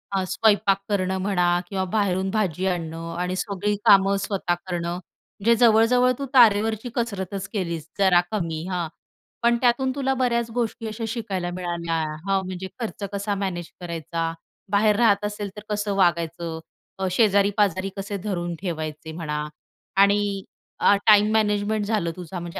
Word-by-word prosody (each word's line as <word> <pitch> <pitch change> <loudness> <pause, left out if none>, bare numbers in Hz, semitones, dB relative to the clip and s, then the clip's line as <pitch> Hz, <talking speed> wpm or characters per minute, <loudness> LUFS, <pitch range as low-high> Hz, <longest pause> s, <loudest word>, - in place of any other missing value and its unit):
हा 190 - +1
स्वयंपाक 205 -2 +3
करणं 190 -2 0
म्हणा 180 -3 +2
किंवा 190 -1 -2
बाहेरून 190 -2 +1
भाजी 190 -4 -1
आणणं 165 -1 -3
आणि 180 +1 -1
सगळी 205 +2 -1
कामं 195 0 +6
स्वतः 195 -3 -1
करणं. 175 -1 -2 0.5
म्हणजे 230 +3 +4
जवळ-जवळ 240 +3 +5
तू 275 - -2
तारेवरची 220 -1 +4
कसरतच 200 -5 -3
केलीस 170 -6 -3
जरा 190 -3 +5
कमी 165 -6 -2
हा. 175 -2 -1 0.6
पण 235 0 +4
त्यातून 260 +2 +2
तुला 270 -1 0
बऱ्याच 235 -2 0
गोष्टी 230 -1 -2
अशा 220 +1 -5
शिकायला 200 -6 -3
मिळाल्या. 170 -2 -2 0.3
हां 195 -1 +2
म्हणजे 185 0 -5
खर्च 220 -3 -5
कसा 200 0 -1
मॅनेज 185 -4 -4
करायचा? 165 -1 -3 0.4
बाहेर 210 +1 +4
राहत 205 -3 +3
असेल 205 -1 -4
तर 210 - -8
कसं 205 -1 -1
वागायचं? 170 -2 0 0.4
अ, 190 - 0
शेजारी-पाजारी 200 -2 +2
कसे 200 +1 -4
धरून 175 -4 -2
ठेवायचे 160 -3 -4
म्हणा 150 -2 -3 0.6
आणि 200 -1 +2 0.4
अ, 205 - +5
टाईम 210 0 +6
मॅनेजमेंट 210 -1 +1
झालं. 205 -6 0
तुझा 180 0 -7
म्हणजे 170 0 -6
195 Hz, 145 wpm, -24 LUFS, 175-210 Hz, 0.6 s, कामं